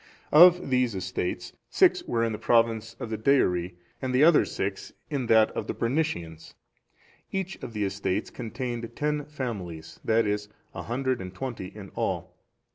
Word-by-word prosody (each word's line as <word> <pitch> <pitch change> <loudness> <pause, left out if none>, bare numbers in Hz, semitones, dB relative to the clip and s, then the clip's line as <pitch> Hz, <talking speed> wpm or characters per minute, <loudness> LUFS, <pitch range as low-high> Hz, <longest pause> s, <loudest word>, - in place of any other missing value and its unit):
Of 175 -1 +7
these 125 -4 +2
estates 95 -1 -3 0.2
six - - +4
were 115 -1 0
in 115 - 0
the 105 - -4
province 115 -1 +2
of 115 - -5
the 110 - -3
Deiri, 90 -9 +2 0.3
and 130 -1 -1
the 130 - +5
other 165 0 +6
six 95 0 -4 0.2
in 135 -5 -1
that 110 -1 +5
of - - -4
the - - -3
Bernicians. 115 - -2 0.8
Each 190 -1 -3
of 120 - -7
the 105 -1 -1
estates 95 -1 -2
contained 120 -1 -5
ten 150 -1 -1
families, 90 - -6
that 110 0 +3
is, 105 0 -2 0.2
a - - -5
hundred 130 0 -1
and 90 0 -8
twenty 120 -5 -5
in 100 0 -10
all. - - -3
115 Hz, 165 wpm, -27 LUFS, 100-130 Hz, 0.8 s, Of